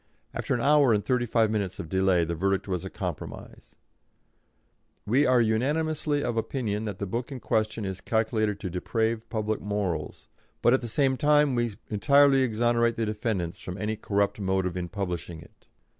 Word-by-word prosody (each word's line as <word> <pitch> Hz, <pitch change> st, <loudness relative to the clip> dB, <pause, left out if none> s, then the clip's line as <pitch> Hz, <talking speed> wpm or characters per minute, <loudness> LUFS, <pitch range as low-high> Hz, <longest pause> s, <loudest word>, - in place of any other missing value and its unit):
After -, -, -1 dB
an 120 Hz, -, -2 dB
hour 145 Hz, -3 st, +5 dB
and 105 Hz, -1 st, 0 dB
thirty 125 Hz, -2 st, +1 dB
five 110 Hz, -1 st, +2 dB
minutes 100 Hz, -4 st, -2 dB
of -, -, -6 dB
delay 95 Hz, -1 st, +2 dB
the 85 Hz, -, -3 dB
verdict 95 Hz, +4 st, 0 dB
was 90 Hz, -3 st, -2 dB
a -, -, -5 dB
compromise: -, -, -7 dB, 1.3 s
"We 130 Hz, +7 st, +3 dB
are 125 Hz, -1 st, +4 dB
unanimously 145 Hz, +6 st, 0 dB
of 120 Hz, -, -2 dB
opinion 110 Hz, -3 st, -2 dB
that 105 Hz, -3 st, -4 dB
the 100 Hz, -, -3 dB
book 120 Hz, +7 st, -4 dB
in 135 Hz, -, -5 dB
question 110 Hz, -2 st, -1 dB
is 95 Hz, -1 st, -5 dB
calculated 110 Hz, -2 st, 0 dB
to 95 Hz, -, -3 dB
deprave 110 Hz, +5 st, -1 dB
public 110 Hz, -1 st, -2 dB
morals, 100 Hz, -5 st, -3 dB, 0.4 s
but 120 Hz, -, +5 dB
at 130 Hz, -, +3 dB
the 120 Hz, -, -5 dB
same 130 Hz, +3 st, +1 dB
time 150 Hz, -1 st, +4 dB
we 120 Hz, -3 st, -1 dB, 0.2 s
entirely 140 Hz, +5 st, +5 dB
exonerate 120 Hz, -1 st, +2 dB
the 115 Hz, -, -1 dB
defendants 105 Hz, -6 st, -2 dB
from 90 Hz, +1 st, -7 dB
any 105 Hz, +1 st, -2 dB
corrupt 100 Hz, -1 st, 0 dB
motive 95 Hz, -2 st, 0 dB
in 90 Hz, -1 st, -4 dB
publishing 90 Hz, -4 st, -4 dB
it." 80 Hz, -, -18 dB
110 Hz, 175 wpm, -27 LUFS, 100-120 Hz, 1.3 s, hour